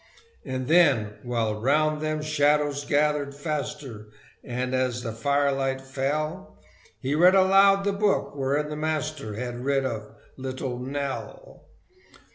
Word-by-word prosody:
And 130 -1 -4
then, 140 -11 +4
while 115 -3 -2
round 150 +4 +2
them 155 -1 -2
shadows 145 -1 +1
gathered 145 -1 +1
faster, 140 -7 -5 0.4
And 125 +1 -3
as 125 -2 0
the 115 - -3
firelight 135 +2 0
fell, 140 +3 -3 0.4
He 135 +2 -2
read 180 +5 +6
aloud 195 +1 +5
the 200 0 0
book 200 -6 0
wherein 140 +2 0
the 150 - -4
Master 155 -6 -3
Had 120 +1 -5
writ 135 0 +1
of 110 -4 -4 0.3
"Little 130 -1 -4
Nell." 140 - -6
140 Hz, 125 wpm, -26 LUFS, 130-155 Hz, 0.4 s, read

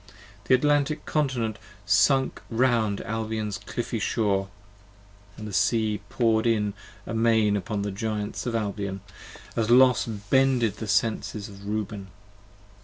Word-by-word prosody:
The 130 - +5
Atlantic 145 +2 +1
Continent 125 -8 -1 0.3
sunk 135 +7 +3
round 115 -4 +1
Albion's 110 -2 -3
cliffy 115 +3 -4
shore, 100 -3 0 0.9
And 110 - -7
the 105 - -7
Sea 110 0 +1
poured 115 -1 +2
in 105 -3 +1 0.3
amain 110 -2 +2
upon 100 +1 -2
the 100 - -2
Giants 105 +3 -3
of 115 - -1
Albion, 100 -3 -3 0.5
40 - - 0
As 110 - -1
Los 125 0 +5
bended 115 +1 +1
the 110 - -5
Senses 105 0 0
of 100 0 -11
Reuben. 105 -2 -3
110 Hz, 125 wpm, -26 LUFS, 105-120 Hz, 0.9 s, The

